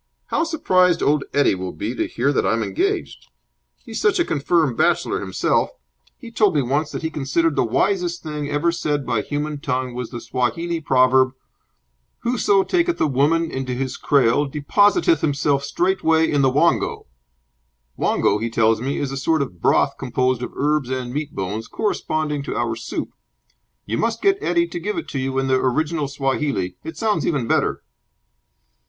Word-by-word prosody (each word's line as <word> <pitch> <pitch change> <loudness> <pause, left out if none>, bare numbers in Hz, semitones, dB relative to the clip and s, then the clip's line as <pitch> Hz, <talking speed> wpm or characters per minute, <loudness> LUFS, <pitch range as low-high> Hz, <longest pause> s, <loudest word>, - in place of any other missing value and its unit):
How - - +1
surprised 185 - +2
old 150 0 +2
Eddie 145 -6 +3
will 95 -1 -5
be 110 +4 -4
to - - -2
hear 135 +5 0
that - - +1
I'm 115 0 +1
engaged. 395 +4 -2 0.6
He's - - -5
such 425 -3 +3
a 345 - +2
confirmed 150 -2 +1
bachelor - - +1
himself. - - 0 0.5
He 230 - -11
told 210 -6 +2
me 145 - +2
once 145 +5 0
that - - -6
he 160 - -2
considered 155 +2 0
the - - +2
wisest 175 - 0
thing 150 -2 -4
ever 145 +4 +1
said 150 -4 -2
by 120 -3 0
human 145 +2 -3
tongue 130 -4 -2
was 125 -1 -5
the 120 - -6
Swahili 130 +9 -2
proverb 130 -1 +3 0.9
'Whoso 205 -5 +2
taketh 345 - 0
a - - +3
woman 155 +4 +1
into 130 -1 -3
his 130 0 -3
kraal 140 0 +2
depositeth 205 - +2
himself 140 -1 +1
straightway 160 0 +2
in 145 - +2
the 135 - +4
wongo.' 155 +6 +1 0.9
Wongo, 105 - +1
he 115 +2 -2
tells 110 -1 +2
me, 135 +3 -2
is 140 -2 -2
a 135 - -4
sort 150 +2 +1
of 90 -10 -10
broth - - +2
composed 125 0 0
of 125 - -4
herbs 150 -2 0
and 130 -2 -3
meat 150 0 -4
bones, 105 +4 -4
corresponding 155 -8 -2
to 140 - -5
our 115 0 -1
soup. 115 - -5 0.7
You 110 - -2
must 230 0 0
get 395 0 +2
Eddie 170 0 +1
to 175 - -5
give 210 +5 -3
it 335 - -5
you 135 -1 -2
in 135 - +1
the 130 0 +2
original 150 +4 0
Swahili. 135 -9 -1
It 160 - -7
sounds 220 -2 0
even 140 -8 0
better." - - 0
145 Hz, 175 wpm, -21 LUFS, 130-170 Hz, 0.9 s, the